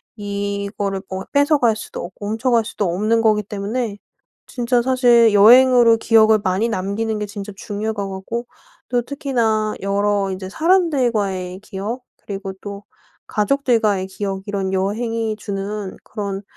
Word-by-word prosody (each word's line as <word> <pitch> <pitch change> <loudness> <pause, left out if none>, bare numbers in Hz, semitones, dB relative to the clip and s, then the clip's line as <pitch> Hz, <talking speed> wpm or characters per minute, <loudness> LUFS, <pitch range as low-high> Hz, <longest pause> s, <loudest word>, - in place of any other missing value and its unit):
이거를 200 -1 -3
뭐 190 0 -5
뺏어갈 285 -5 +3
수도 220 - -7
없고 205 +3 -7
훔쳐 225 +4 0
갈 230 -1 +4
수도 210 -2 -3
없는 220 +4 +1
거기 215 -2 +3
때문에 205 +2 -3 0.5
진짜 245 -1 0
사실 240 -3 +4
여행으로 240 +2 +7
기억을 220 -1 +4
많이 190 +5 +1
남기는 215 +2 -2
게 210 - -2
진짜 205 0 -7
중요할 215 +1 -4
것 200 -1 -3
같고 195 +5 -5 0.4
또 245 0 +1
특히나 235 -6 -1
여러 200 0 0
이제 185 0 -5
사람들과의 235 - +1
기억 215 +5 -5 0.2
그리고 195 -1 -5
또 200 0 -7 0.4
가족들과의 215 -4 +1
기억 195 0 -4
이런 195 -2 -2
여행이 220 +3 -1
주는 200 -1 -5
그런 200 -2 -5
210 Hz, 300 characters per minute, -20 LUFS, 200-235 Hz, 0.5 s, 여행으로